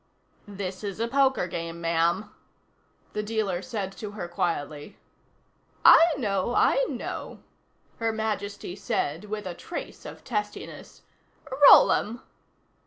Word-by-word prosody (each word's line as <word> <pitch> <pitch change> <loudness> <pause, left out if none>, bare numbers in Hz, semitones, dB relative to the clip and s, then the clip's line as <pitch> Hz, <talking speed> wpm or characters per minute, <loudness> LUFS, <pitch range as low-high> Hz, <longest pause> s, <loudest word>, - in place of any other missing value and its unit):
"This 195 -1 -6
is 200 0 -5
a 230 - 0
poker 270 -4 +2
game, 170 -1 -5
ma'am," 170 +5 0 0.8
the 210 - -1
dealer 210 -4 -2
said 205 -5 -4
to 210 - -6
her 185 -5 -5
quietly. 160 -1 -3 0.9
"I - - +10
know, 205 -2 -1
I - - +4
know," - - -6 0.5
Her 225 -1 0
Majesty 205 -4 -4
said 165 -2 -2
with 210 0 -5
a 180 - -4
trace 335 - -8
of - - -10
testiness. 210 -3 -5 0.7
"Roll - - +8
'em." 235 +4 -1
205 Hz, 120 wpm, -26 LUFS, 175-220 Hz, 0.9 s, I